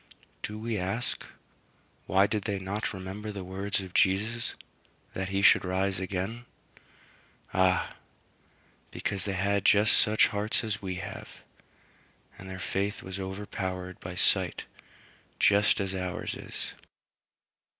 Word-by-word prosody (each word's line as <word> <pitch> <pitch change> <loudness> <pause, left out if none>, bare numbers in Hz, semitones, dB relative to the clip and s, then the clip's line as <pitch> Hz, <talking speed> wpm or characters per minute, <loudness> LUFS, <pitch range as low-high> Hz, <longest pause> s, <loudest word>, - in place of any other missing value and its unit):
Do 105 - -4
we 110 -1 -2
ask, 100 +7 0 0.8
Why 95 +1 +5
did 105 0 -1
they 100 -2 0
not 95 +3 -2
remember 100 +2 -5
the 100 -2 -5
words 95 +2 -2
of 95 -1 -9
Jesus, 110 +5 +2 0.6
that 95 0 -3
he 100 +1 0
should - - +7
rise 95 +1 0
again? 95 +6 -3 1.1
Ah! 95 0 +3 1.0
because 100 -2 -2
they 100 - -1
had 100 +1 +1
just 105 +1 +6
such 110 0 +5
hearts 105 +3 0
as 110 -2 -2
we 95 -2 -3
have, 90 - -7 1.0
and 95 - -8
their 95 - -5
faith 100 +2 -2
was 95 +1 -6
overpowered 95 -1 -4
by 90 0 -7
sight 90 - +2 0.7
just 100 0 +5
as 95 -1 -1
ours 90 -1 -3
is. - - -6
95 Hz, 130 wpm, -29 LUFS, 95-105 Hz, 1.1 s, should